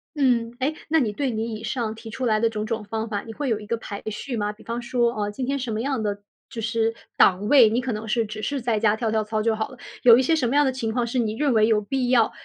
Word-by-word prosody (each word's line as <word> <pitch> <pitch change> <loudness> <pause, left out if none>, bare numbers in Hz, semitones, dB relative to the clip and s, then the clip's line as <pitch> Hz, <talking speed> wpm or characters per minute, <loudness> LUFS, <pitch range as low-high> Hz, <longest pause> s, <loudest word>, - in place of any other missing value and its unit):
嗯。 245 -5 +2
诶， 290 +4 0
那 320 +1 +4
你 225 -6 +1
对 270 +5 -2
你 220 0 -3
以 215 - -8
上 225 -1 -2
提 225 0 -10
出 255 +3 -4
来 215 -2 +2
的 230 0 +2
种 215 -1 -3
种 225 -1 -3
方 220 +2 -4
法， 205 -2 -2
你 225 - -9
会 285 0 -3
有 220 -2 0
一 210 - -10
个 230 - -1
排 200 -2 -7
序 245 +4 -5
吗？ 210 -1 -1
比 210 - -16
方 235 +1 -4
说， 240 -1 +1
啊， 210 -2 -2
今 250 +4 -4
天 280 +1 -1
什 245 -3 -3
么 215 +1 -2
样 270 -2 -1
的 205 -1 -2 0.3
就 225 - -6
是 225 0 0 0.2
档 195 +2 +4
位， 250 -6 +7
你 235 +3 0
可 255 - -3
能 215 +1 -5
是 230 +1 +1
只 215 0 -7
是 275 +3 -2
在 230 -2 0
家 215 -1 +3
跳 220 -1 -1
跳 220 -1 +1
操 215 0 -2
就 225 0 +1
好 220 - -3
了， 255 - -13 0.3
有 235 -1 +9
一 - - +4
些 320 +5 +2
什 255 -6 +1
么 275 - 0
样 290 - +5
的 265 - +2
情 235 -4 -3
况 240 +1 0
是 245 +2 -1
你 220 -2 0
认 285 -1 +1
为 220 -1 +4
有 220 -2 +3
必 250 +3 -1
要， 235 -3 +4
230 Hz, 330 characters per minute, -24 LUFS, 215-250 Hz, 0.3 s, 有